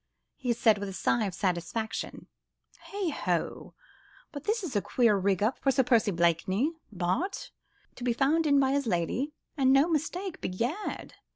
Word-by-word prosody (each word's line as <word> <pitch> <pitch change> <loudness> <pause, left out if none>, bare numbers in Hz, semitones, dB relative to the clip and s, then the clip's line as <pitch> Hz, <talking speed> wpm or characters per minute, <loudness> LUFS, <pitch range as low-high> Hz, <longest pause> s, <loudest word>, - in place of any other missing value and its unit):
he 250 -4 -2
said, 220 -3 +3
with 200 0 -4
a - - -7
sigh 220 +3 +1
of 195 - -3
satisfaction. 190 +4 -3 0.6
"Heigh 395 -5 -2
ho! - - -2 0.6
but 285 -2 -8
this 430 0 0
is 295 -10 -5
a 205 - +3
queer 230 -2 +3
rig 195 0 +1
up 225 +5 0
for 275 - +1
Sir 265 0 +3
Percy 235 -4 +3
Blakeney, 185 - +1 0.2
Bart., 195 - -2 0.5
to - - -8
be 245 - +2
found 295 +6 +2
in 285 -1 +5
by 265 -1 +3
his 280 -2 0
lady, 220 - -1 0.2
and 265 -3 +3
no 275 +4 +5
mistake. 345 +3 -2
Begad!" 240 - -3
245 Hz, 170 wpm, -29 LUFS, 200-295 Hz, 0.6 s, in